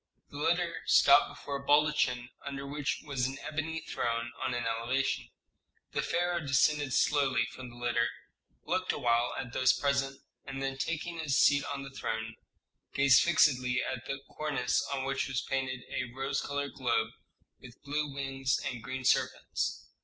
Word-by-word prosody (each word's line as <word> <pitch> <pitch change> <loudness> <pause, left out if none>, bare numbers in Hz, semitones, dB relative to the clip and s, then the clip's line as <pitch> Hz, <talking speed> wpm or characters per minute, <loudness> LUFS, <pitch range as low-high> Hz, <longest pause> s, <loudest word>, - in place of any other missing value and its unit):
The 145 - -8
litter 170 +2 +1
stopped - - +6
before 140 -1 -5
a 140 - -10
baldachin 145 -4 +2
under 140 -1 -5
which 145 0 -2
was 135 -4 0
an 135 +1 -5
ebony 160 +1 -3
throne 115 +1 -2
on 130 -2 -1
an 120 - -2
elevation. 120 +4 -1 0.6
The - - 0
pharaoh 175 0 0
descended 145 -1 +2
slowly 135 -6 +3
from 130 -1 -9
the 120 - -13
litter, 120 -1 +1 0.5
looked 185 0 0
awhile 120 -2 +1
at 125 -1 -5
those 130 0 +4
present, 140 -1 0 0.2
and 135 0 -6
then, 135 0 -2
taking 170 +3 -3
his 150 -4 +1
seat 140 -1 +5
on 140 -1 -4
the 135 - -9
throne, 110 -4 -3 0.6
gazed 140 -2 +6
fixedly 130 -7 +3
at 130 -1 -4
the 135 0 -4
cornice 135 -5 0
on 135 -1 -1
which 135 0 -1
was 135 -1 -2
painted 130 -2 -2
a 125 -2 -2
rose 135 +1 -1
colored 140 0 -3
globe 115 -4 0 0.5
with 125 -2 -14
blue 145 +1 -2
wings 135 -1 -1
and 120 -2 -3
green 130 +3 -5
serpents. - - 0
135 Hz, 160 wpm, -31 LUFS, 125-145 Hz, 0.6 s, stopped